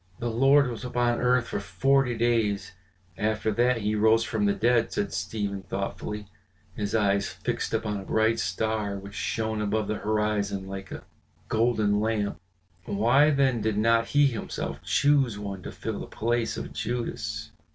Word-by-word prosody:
"The 120 0 -2
Lord 135 +4 +5
was 120 -1 -5
upon 120 -1 0
earth 125 -1 +2
for - - -2
forty 120 +6 +1
days 115 -4 +1 0.5
after 110 0 0
that 120 +3 +2
he 105 +1 +1
arose 110 +2 +4
from 110 -2 -1
the 100 - +3
dead," 115 +3 +2
said 100 - -2
Stephen 100 -1 -3
thoughtfully, 100 +2 -4 0.5
his 105 +1 -2
eyes 100 -2 +2
fixed - - -3
upon 110 -2 -1
a - - -7
bright 110 +3 +1
star 100 +3 -1
which 100 +1 -10
shone 110 0 -2
above 105 0 0
the 110 - -1
horizon 105 -2 -1
like 95 0 -7
a - - -7 0.5
golden 110 -3 +2
lamp. 105 -4 -1 0.5
"Why 120 +10 +4
then 135 -5 +2
did 110 -1 0
not 115 +1 +3
he 145 0 +4
himself 120 -6 -3
choose 140 -6 +2
one 100 -2 -5
to - - -7
fill - - -5
the - - -6
place 115 +1 -1
of - - -6
Judas?" 120 +1 -3
110 Hz, 160 wpm, -27 LUFS, 100-120 Hz, 0.5 s, Lord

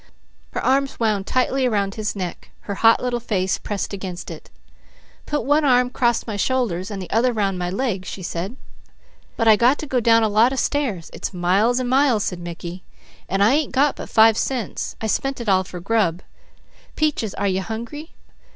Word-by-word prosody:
Her - - -3
arms 275 +1 +1
wound 210 -4 0
tightly 255 +1 +1
around 200 -4 0
his 215 -1 -3
neck. 180 -3 -6
Her 200 - -5
hot 225 +4 +4
little 245 -1 -1
face 190 -5 -1
pressed 205 -1 -4
against 185 -2 -6
it. - - -10 0.8
"Put 295 -5 -1
one 295 +3 +3
arm 250 -2 +3
'cross 240 -3 +1
my 215 -3 -4
shoulders, 205 -6 -1
an' 205 - -5
the 185 -2 -7
other 240 +3 +3
round 200 -5 -1
my 175 0 -2
legs," 195 -2 -2
she 185 - -7
said. 175 +6 -4 0.8
"But 230 - +1
I 220 - +8
got 245 +6 +3
to - - -6
go 260 -3 0
down 230 -1 +4
a - - +3
lot 220 +4 +4
of - - -4
stairs; 240 - -1
it's - - -5
miles 195 +8 +2
and 255 - -2
miles," 260 -4 +3
said 180 - -3
Mickey, 175 +1 -7 0.5
"and 195 +2 +2
I 220 +5 +5
ain't 300 -1 0
got 280 +1 +3
but - - -8
five 220 0 +5
cents. 250 -7 -3
I - - -4
spent 270 +5 -1
it 235 - -6
all 190 -2 +3
for 180 -1 -8
grub. 190 -3 0 0.7
Peaches, 295 -10 -1
are - - -2
you 190 0 0
hungry?" 235 - -7
220 Hz, 195 wpm, -22 LUFS, 190-255 Hz, 0.8 s, I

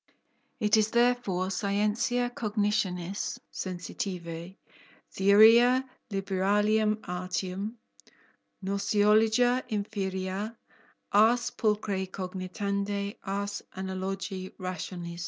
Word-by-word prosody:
It 215 -1 +4
is 215 0 +3
therefore 235 -6 +2
_scientia 210 +5 0
cognitionis 205 -4 -1 0.2
sensitivae, 180 -1 -5 0.6
theoria 230 +6 +6 0.2
liberalium 205 +2 +1
artium, 185 +4 -3 0.9
gnoseologia 215 +5 +3
inferior, 200 0 -3 0.5
ars 230 +4 +4
pulcre 210 -3 0
cogitandi, 200 +3 -3
ars 200 +1 -3
analogi 190 0 -4
rationis_. 175 -1 -5
200 Hz, 65 wpm, -29 LUFS, 190-215 Hz, 0.9 s, theoria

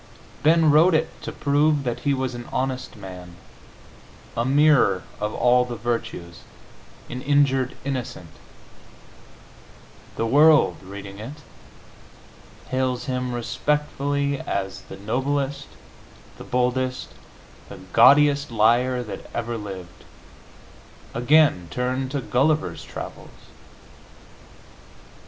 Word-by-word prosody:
Ben 160 0 +4
wrote 160 +4 +5
it 160 +1 -2
to - - -5
prove 145 0 +1
that 120 -2 -3
he 145 - 0
was 130 -1 -2
an 120 0 -8
honest 130 0 -3
man, 90 -3 -10 1.0
a 115 - 0
mirror 135 -8 +4 0.2
of 105 0 -2
all 125 0 +4
the 125 -1 -6
virtues, 115 -7 -4 0.7
an 125 - -6
injured 135 -2 +2
innocent; 125 - -5 1.8
the 115 - -1
world, 150 +6 +5
reading 100 +1 -9
it, 145 +7 -9 1.3
hails 130 -1 -1
him 125 -1 -2
respectfully 140 +2 -1
as 95 -1 -4
the - - -11
noblest, 135 +6 -2 0.7
the - - -8
boldest, 125 +1 -1 0.6
the - - -9 0.2
gaudiest 145 0 +5
liar 120 +3 +2
that 110 - -9
ever 120 0 -2
lived. 95 -5 -8 1.1
Again, 125 - +3
turn 130 +1 -2
to 140 0 -3
"Gulliver's 150 +6 0
Travels." - - -8
130 Hz, 100 wpm, -23 LUFS, 115-145 Hz, 1.8 s, wrote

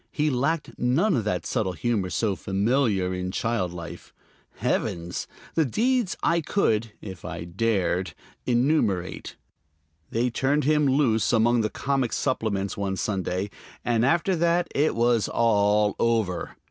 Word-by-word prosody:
He 150 0 0
lacked 140 +5 -1
none 150 +11 +2
of 115 -5 -1
that 90 -5 -1
subtle 95 -3 -1
humor 100 +1 -1
so 95 +5 0
familiar 100 -1 +1
in 90 0 -3
child 100 -2 -1
life. 85 -1 -9 0.4
Heavens! 85 +1 -2 0.3
the 160 - +3
deeds 235 - 0
I 170 0 +2
could 115 - 0
(if 95 -5 -9
I 85 -1 -5
dared) 95 -2 -1 0.3
enumerate. 120 - 0 0.7
They 120 +2 0
turned 140 +5 +1
him 150 +1 +3
loose 130 -6 +2
among 120 0 +3
the 110 - 0
comic 135 +1 -1
supplements 105 -7 -1
one 100 -1 -2
Sunday, 95 -1 -2 0.3
and 115 -1 +2
after 170 +7 +2
that 170 +1 +2
it 150 +2 +2
was 115 -2 +2
all 105 -2 +2
over. 110 -6 0
115 Hz, 135 wpm, -25 LUFS, 95-135 Hz, 0.7 s, the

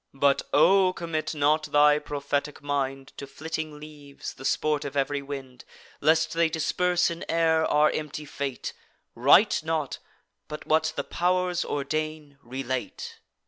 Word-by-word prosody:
But 140 0 +3
O! 185 +4 +5
commit 165 -2 -3
not 150 +1 +2
thy 150 0 +4
prophetic 145 0 -3
mind 135 -2 -2
To 140 - -7
flitting 155 0 -5
leaves, 145 -2 -9
the 135 - -11
sport 150 +1 +1
of 145 0 -5
ev'ry 140 +1 0
wind, 135 -3 -8 0.4
Lest 160 +1 +3
they 165 0 +2
disperse 175 +3 +1
in 170 +2 -6
air 160 -1 +3
our 150 +1 +4
empty 150 0 -5
fate; 140 -2 -5 0.4
Write 145 - +5
not, 160 -3 -2 0.5
but, 150 0 -7
what 155 0 +2
the - - -2
pow'rs 180 0 0
ordain, 150 0 -4
relate." 130 +1 -5
150 Hz, 140 wpm, -26 LUFS, 140-160 Hz, 0.5 s, O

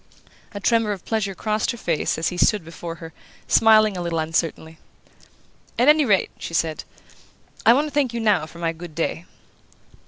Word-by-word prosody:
A 205 - -6
tremor 225 0 +1
of 190 - -10
pleasure 210 -4 -2
crossed 215 +1 -1
her 240 - -2
face 165 -8 -1
as 160 - 0
he 180 - -6
stood 205 -2 +2
before 165 0 -7
her, 165 0 -11 0.3
smiling 215 -2 +5
a 180 - -4
little 170 -1 -2
uncertainly. 160 0 -2 1.0
"At 245 +4 +4
any 300 -1 +5
rate," 200 -5 +2
she 165 - -6
said, 160 -2 -1 0.8
"I 230 - +9
want 285 +4 +2
to 300 - -6
thank 280 -4 +1
you 235 - -4
now 205 -8 +2
for 170 - -14
my 170 -1 -1
good 165 -1 -11
day." 165 +1 -2
190 Hz, 185 wpm, -22 LUFS, 165-225 Hz, 1.0 s, I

